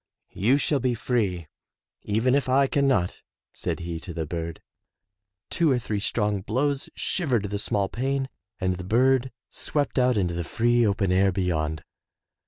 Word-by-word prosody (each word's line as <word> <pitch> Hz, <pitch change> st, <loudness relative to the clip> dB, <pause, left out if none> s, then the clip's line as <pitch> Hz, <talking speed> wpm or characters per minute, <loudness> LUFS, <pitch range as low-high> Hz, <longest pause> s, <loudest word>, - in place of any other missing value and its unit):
"You 120 Hz, +8 st, +3 dB
shall 145 Hz, 0 st, +1 dB
be 125 Hz, -1 st, 0 dB
free, 105 Hz, -8 st, -1 dB, 0.6 s
even 110 Hz, +5 st, +1 dB
if 140 Hz, -2 st, +1 dB
I 135 Hz, +2 st, +5 dB
can 140 Hz, +1 st, +1 dB
not,*' 100 Hz, -10 st, +1 dB, 0.3 s
said -, -, -3 dB
he 85 Hz, -1 st, -4 dB
to 85 Hz, 0 st, -8 dB
the 80 Hz, -1 st, -2 dB
bird. 85 Hz, +1 st, -4 dB, 0.9 s
Two 170 Hz, -2 st, +3 dB
or 130 Hz, -, +3 dB
three 110 Hz, -3 st, -2 dB
strong 105 Hz, -1 st, 0 dB
blows 135 Hz, +7 st, -1 dB
shivered 120 Hz, -, 0 dB
the 100 Hz, -, -1 dB
small 100 Hz, -2 st, +1 dB
pane 135 Hz, +4 st, -1 dB, 0.3 s
and 95 Hz, -1 st, 0 dB
the 90 Hz, -, -6 dB
bird 130 Hz, +5 st, +3 dB, 0.2 s
swept 145 Hz, -2 st, -1 dB
out 125 Hz, -2 st, +3 dB
into 90 Hz, -4 st, +1 dB
the 85 Hz, 0 st, -2 dB
free 120 Hz, +6 st, +2 dB
open 100 Hz, -2 st, +1 dB
air 95 Hz, +1 st, +4 dB
beyond. 80 Hz, -4 st, -1 dB
110 Hz, 165 wpm, -26 LUFS, 90-130 Hz, 0.9 s, I